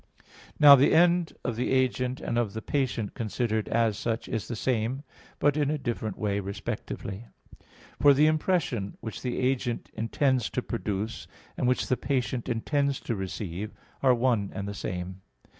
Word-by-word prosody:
Now 145 -2 +11
the 135 +1 +4
end 175 0 +4
of 120 - -1
the 125 - -1
agent 130 0 +1
and 120 - -1
of 110 -4 -1
the 110 - -4
patient 125 -7 -1
considered 110 -1 -1
as 115 -3 +1
such 115 0 -2
is 115 -4 -3
the 120 - -4
same, 125 +3 -1 0.3
but 145 -1 +2
in 145 -2 +1
a 155 - 0
different 115 -6 -3
way 100 -1 0
respectively. 100 +1 -5 0.7
For 145 -1 +7
the 150 +3 +5
impression 155 - 0
which 110 - -6
the 125 -1 -2
agent 125 -2 -1
intends 125 +2 +1
to 125 - -2
produce, 110 0 -3 0.3
and - - 0
which 125 - +2
the 130 - +1
patient 125 -2 -1
intends 140 +4 0
to 115 - -2
receive, 95 +1 -5 0.3
are 130 -2 +5
one 115 -5 +1
and 100 0 -4
the 100 - -4
same. 90 -1 -5
120 Hz, 165 wpm, -28 LUFS, 110-135 Hz, 0.7 s, Now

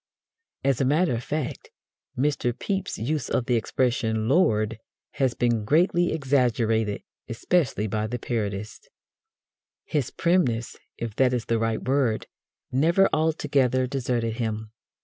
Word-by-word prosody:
As 135 -2 +2
a - - +3
matter 155 +3 +2
of 115 +1 -3
fact, 150 0 -4 0.5
Mr. 130 -3 0
Pepys's 190 - -3
use 150 -4 -1
of 125 - 0
the 125 - 0
expression 115 -1 0
"Lord!" 115 - +2 0.4
has 130 -3 +2
been 120 -3 +1
greatly 175 - +3
exaggerated, 120 -7 +1 0.3
especially 120 - 0
by 110 0 -1
the 120 +3 -3
parodists. 105 -3 -4 1.0
His 145 -5 -1
primness, 145 -10 +1 0.2
if 115 -3 -5
that 130 -1 +3
is 120 -3 -1
the 115 -1 0
right 115 0 -1
word, 130 -5 +1 0.5
never 170 +9 +4
altogether 140 -5 +2
deserted 120 -3 -2
him. 110 -2 -3
125 Hz, 130 wpm, -25 LUFS, 115-145 Hz, 1.0 s, never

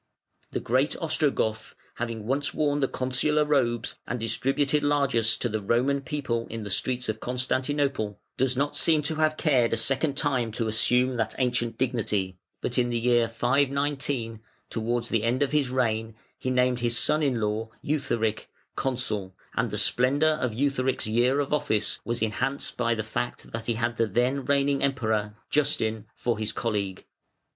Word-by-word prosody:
The - - -2
great 130 +5 +1
Ostrogoth, 145 -9 0 0.2
having 115 -2 -4
once 135 +4 -1
worn 145 -1 +1
the 135 - +2
Consular 135 +5 +1
robes 120 -6 0
and 125 - -2
distributed 135 +5 +1
largess 140 -6 +2
to 120 - -1
"the 110 -2 -2
Roman 125 +7 +1
People" 135 -5 -2
in 115 -1 -5
the 105 - -5
streets 125 +5 0
of 110 0 -2
Constantinople, 130 -3 -1 0.2
does 130 0 +1
not 145 +2 0
seem 155 -2 +3
to 155 +2 -2
have 155 0 +2
cared 130 -8 +2
a - - +1
second 135 +4 +1
time 130 -7 0
to 115 0 -1
assume 125 +3 +2
that 110 -2 -1
ancient 120 -3 0
dignity, 105 -7 -1 0.3
but 125 +1 0
in 120 -1 +2
the 120 - 0
year 120 0 +3
519, 135 -1 0 0.3
towards 120 +1 -1
the 115 - +1
end 120 +5 +1
of 140 - -1
his 150 -4 +2
reign, 115 -3 0 0.2
he 130 - -2
named 125 -1 +2
his 120 0 +1
son 150 +6 +3
in 135 -5 +1
law, 110 +1 -1
Eutharic, 115 -7 -1 0.3
Consul, 110 -8 -2 0.2
and - - +1
the - - -3
splendour 140 +5 +3
of 130 -6 -1
Eutharic's 130 0 0
year 120 +5 +2
of 145 0 -1
office 110 -8 0
was 120 -1 -1
enhanced 130 +6 -1
by 120 -1 +1
the 110 - -2
fact 115 +2 -4
that 115 -1 -5
he 120 - +1
had 115 +1 -1
the 115 - +2
then 125 +6 0
reigning 140 0 +2
Emperor, 110 -6 0 0.2
Justin, 110 -7 +1
for 120 -3 -1
his 110 0 0
colleague. 100 -5 -2
125 Hz, 170 wpm, -27 LUFS, 115-140 Hz, 0.3 s, seem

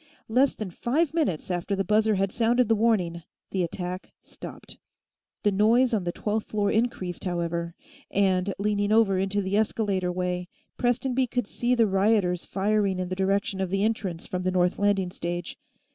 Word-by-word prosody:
Less 255 +4 +3
than 210 -4 -5
five 290 - 0
minutes 250 - -1
after 180 +3 -1
the 195 - 0
buzzer 215 +2 +3
had 195 0 0
sounded 240 +2 +2
the 225 - +3
warning, 200 -7 +1 0.3
the 190 - 0
attack 180 +1 -4
stopped. - - -10 0.6
The 205 - +3
noise 230 +5 +3
on 200 -5 0
the 175 - 0
twelfth 210 +4 -2
floor 205 -2 0
increased, 215 -6 -1
however, 170 -1 -2 0.3
and, 190 -1 +2
leaning 205 0 0
over 215 -4 +4
into 195 +1 0
the 190 +1 -1
escalator 205 -4 0
way, 180 0 -2 0.3
Prestonby 250 +1 +1
could 245 0 -1
see 245 +4 0
the 230 -2 +4
rioters 195 -3 +2
firing 200 -1 +1
in 185 -1 -3
the 185 - -2
direction 195 0 0
of 190 - -1
the 195 +2 0
entrance 195 -6 -2
from 180 - -3
the 185 - 0
north 180 0 +1
landing 200 -3 +1
stage. 175 0 -4
200 Hz, 175 wpm, -26 LUFS, 180-220 Hz, 0.6 s, over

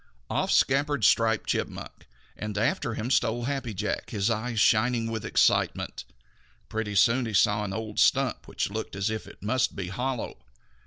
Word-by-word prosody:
Off - - 0
scampered 140 -1 +2
Striped 115 +1 +3
Chipmunk, - - -4 0.3
and 105 -1 -5
after 110 +1 0
him 115 +4 -3
stole 120 -2 +1
Happy 135 -2 -2
Jack, 100 - -3
his 100 +2 0
eyes 115 0 -2
shining 115 +1 +3
with 110 -2 -3
excitement. - - +1 0.6
Pretty 110 -2 -3
soon 115 +5 +4
he 110 - -3
saw 105 +2 +3
an 100 - -4
old 110 +1 -4
stump - - +2
which - - -3
looked 110 -2 -5
as 100 +2 -1
if 110 - -5
it - - -14
must 130 +4 0
be 95 -2 -4
hollow. 125 +4 -3
110 Hz, 165 wpm, -27 LUFS, 105-120 Hz, 0.6 s, soon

